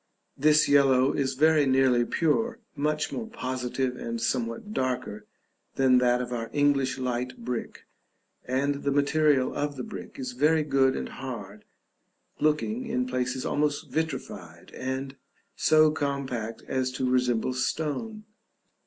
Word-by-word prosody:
This 150 +2 +4
yellow 135 -2 +4
is 135 -1 -1
very 155 0 +4
nearly 130 -2 +3
pure, 225 - 0 0.2
much 150 +1 -1
more 225 - -4
positive 130 - -3
and 115 0 -4
somewhat 120 - -2
darker 125 - -3 0.5
than 130 -2 +4
that 125 0 +2
of 125 0 -6
our 115 -1 -4
English 140 -3 +2
light 125 -1 -3
brick, 125 -1 -5 0.6
and 140 +3 -1
the 140 - +1
material 145 -1 +2
of 145 0 -2
the 130 - -5
brick - - -9
is 130 -2 -4
very 150 +5 +2
good 135 -3 +2
and - - -3
hard, 105 -6 -8 0.7
looking, 215 +11 0
in 250 +2 0
places, 130 - -2
almost 145 0 -1
vitrified, 160 +1 -5
and 130 +1 -4 0.4
so 155 0 +5
compact 135 -7 -3
as 130 -1 -1
to 130 0 -1
resemble 125 -1 +1
stone. 160 - -2
135 Hz, 135 wpm, -27 LUFS, 125-150 Hz, 0.7 s, so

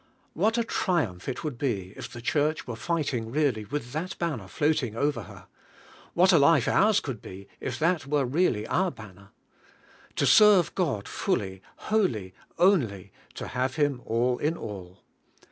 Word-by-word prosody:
What 215 +8 +1
a 235 - +2
trium'ph 150 - -1
it 130 +6 -5
would 145 -6 -4
be 100 -9 -2
if - - -8
the 120 -1 -9
Church 150 +4 0
were 120 - -5
fighting 135 -6 -2
really 130 -5 0
with 135 -1 -5
that 170 +7 -4
banner 150 - -3
floating 145 -3 0
over 140 -1 0
her! - - -13 0.7
What 185 +3 +5
a 165 - +6
life 140 -3 +4
ours 210 0 +4
could 135 -5 -6
be 95 +1 -10
if 125 -2 -4
that 160 -2 +1
were 145 -1 +1
really 125 -6 +1
our 185 +8 +1
banner! 100 - -13 0.9
To - - +1
serve 210 -5 +6
God 140 - -1
fully, 95 -1 -2 0.3
wholl}?', 125 - +1 0.3
only, 130 - +2 0.2
to - - -6
have 130 +1 -1
Him 145 -5 0
all 120 +2 0
in 160 +3 0
all! 95 -3 -9
140 Hz, 160 wpm, -27 LUFS, 110-165 Hz, 0.9 s, a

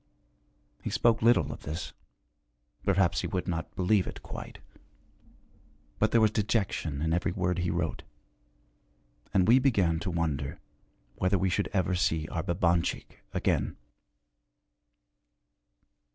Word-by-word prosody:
He - - -3
spoke 115 -1 +2
little 120 +2 +4
of - - -11
this, 80 +3 -5 0.9
perhaps 85 -4 +2
he - - -2
would 90 -2 -3
not 80 -2 -3
believe 95 +1 +2
it, - - -8
quite, - - -8 1.4
but 105 - +3
there 115 - +4
was 110 -2 +4
dejection 100 -9 -1
in 80 0 +1
every 90 +2 0
word 90 0 -1
he 90 0 0
wrote. 85 -2 -2 1.3
And 95 -1 +3
we 120 +4 +7
began 100 -12 +2
to 95 - -3
wonder 80 -5 -2 0.6
whether 95 +2 +2
we 95 0 +1
should 100 - 0
ever 95 -2 +1
see 85 -3 +1
our 85 - -2
Babanchik 85 -1 0
again. - - 0
90 Hz, 125 wpm, -29 LUFS, 85-100 Hz, 1.4 s, we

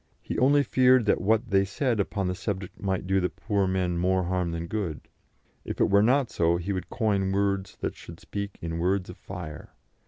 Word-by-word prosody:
He - - -4
only 145 +3 +5
feared 130 -3 +4
that 105 - +2
what 110 +3 +1
they 95 0 +4
said 115 +3 -1
upon 100 -1 -1
the 90 - 0
subject 95 0 -5
might 95 -2 -1
do 95 +1 +2
the 90 -1 0
poor 100 +2 -1
men 90 -2 0
more 95 +1 +2
harm 90 0 -1
than 85 0 -3
good. 85 -5 -4 0.6
If - - -6
it - - +3
were 100 +1 +6
not 125 +3 +3
so, 85 0 +2
he 90 +3 -3
would 95 - -4
coin 100 -5 0
words 100 -1 -1
that - - -2
should 85 - -11
speak 100 -1 -6
in 85 0 -3
words 90 +1 0
of - - -13
fire. 85 -5 -8
95 Hz, 210 wpm, -27 LUFS, 90-105 Hz, 0.6 s, were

